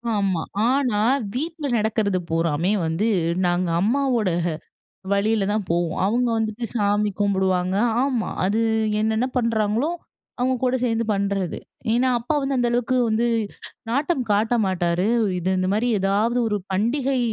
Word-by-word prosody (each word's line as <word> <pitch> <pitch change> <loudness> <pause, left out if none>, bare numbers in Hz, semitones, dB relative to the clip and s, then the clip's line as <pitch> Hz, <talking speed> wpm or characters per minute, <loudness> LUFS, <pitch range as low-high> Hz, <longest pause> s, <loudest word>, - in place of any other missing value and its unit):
ஆமா. 195 -5 0 0.3
ஆனா, 255 -6 +1 0.3
வீட்ல 315 +3 -4
நடக்கிறது 210 -3 0
பூராமே 165 +2 0
வந்து, 165 +7 0 0.4
நாங்க 175 0 +1
அம்மாவோட 240 -1 +1 0.8
வழில 205 0 +1
தான் 210 -2 -1
போவோம். 170 0 0
அவுங்க 240 +4 +1
வந்துட்டு 220 +1 -2
சாமி 205 -1 +1
கும்புடுவாங்க 190 -2 +1 0.3
ஆமா. 255 -5 0 0.2
அது 210 +4 +1 0.4
என்னென்னா 220 +3 +1
பண்றாங்களோ 230 +2 +1 0.5
அவுங்க 255 +1 +1
கூட 255 0 +2
சேந்து 230 -2 +1
பண்றது. 195 -3 -1 0.3
ஏன்னா, 250 +3 +2
அப்பா 245 +7 -2
வந்து 270 0 -1
அந்த 240 -1 +2
அளவுக்கு 245 +1 +1
வந்து, 225 +2 +1 0.6
நாட்டம் 280 +2 0
காட்ட 220 +4 +2
மாட்டாரு. 180 +1 0 0.3
இது 180 +2 -1
இந்த 185 0 0
மாரி 225 +4 +1
ஏதாவது 210 +5 +1
ஒரு 210 -1 0
பண்டிகை 255 +6 0
215 Hz, 130 wpm, -23 LUFS, 195-245 Hz, 0.8 s, கூட